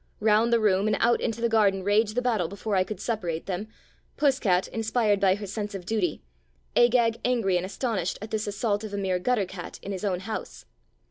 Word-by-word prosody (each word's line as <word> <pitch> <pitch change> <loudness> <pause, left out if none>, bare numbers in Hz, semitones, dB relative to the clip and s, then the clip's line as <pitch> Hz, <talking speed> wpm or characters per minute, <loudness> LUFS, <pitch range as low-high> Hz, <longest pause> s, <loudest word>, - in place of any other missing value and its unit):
Round 220 +2 +3
the 235 - +4
room 205 -1 +2
and 215 - +1
out 235 - +3
into 230 -1 -2
the 235 - +3
garden 205 -4 +2
raged 210 +2 +2
the 250 - 0
battle 220 -9 +1
before 200 +3 -3
I 185 - +4
could 215 +3 -7
separate 175 -8 -3
them 195 +2 -4 0.3
— - - -38
Puss 280 -2 +3
cat 185 -5 +2
inspired 220 -2 +1
by 190 -1 +4
her 205 +1 -6
sense 205 +1 -4
of 185 -2 -7
duty, 190 -5 -1 0.5
Agag 235 -1 +4
angry 230 -7 +1
and 180 +1 0
astonished 195 -3 -2
at 215 +1 -8
this 215 -1 -2
assault 205 0 -1
of 210 -2 -5
a - - -3
mere 190 -2 0
gutter 225 0 +1
cat 180 -1 -8
in 200 - -5
his 190 -1 -5
own 185 -3 -1
house. 220 +3 -6
210 Hz, 220 wpm, -26 LUFS, 190-225 Hz, 0.5 s, the